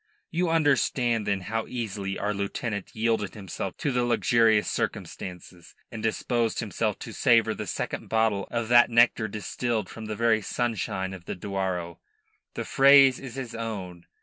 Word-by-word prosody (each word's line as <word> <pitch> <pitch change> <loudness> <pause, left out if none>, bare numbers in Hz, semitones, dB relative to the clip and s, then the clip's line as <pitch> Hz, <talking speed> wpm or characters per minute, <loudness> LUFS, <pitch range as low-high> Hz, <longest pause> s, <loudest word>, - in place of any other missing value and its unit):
You 175 +1 0
understand, 130 -7 +2
then, 100 -1 0
how 110 +5 -3
easily 100 -5 -4
our 105 +1 -1
lieutenant 100 +1 -4
yielded 110 -2 0
himself 95 -5 -6
to 145 - -1
the 125 -1 +1
luxurious 115 -2 +3
circumstances, 90 -1 -5 0.2
and 115 -2 -6
disposed 115 +1 0
himself - - -2
to - - -7
savour - - +3
the - - -6
second - - -4
bottle 110 -3 +1
of 115 -1 -2
that 120 0 +6
nectar 115 -1 +4
distilled 110 +1 -3
from 110 - -8
the 110 0 -4
very 115 -1 +2
sunshine 100 -4 -2
of 90 -2 -10
the - - -4
Douro 90 -3 -3 0.6
the - - -3
phrase 135 -1 +6
is 130 -3 -8
his 130 -3 -6
own. 95 -7 -6
110 Hz, 155 wpm, -26 LUFS, 100-120 Hz, 0.6 s, that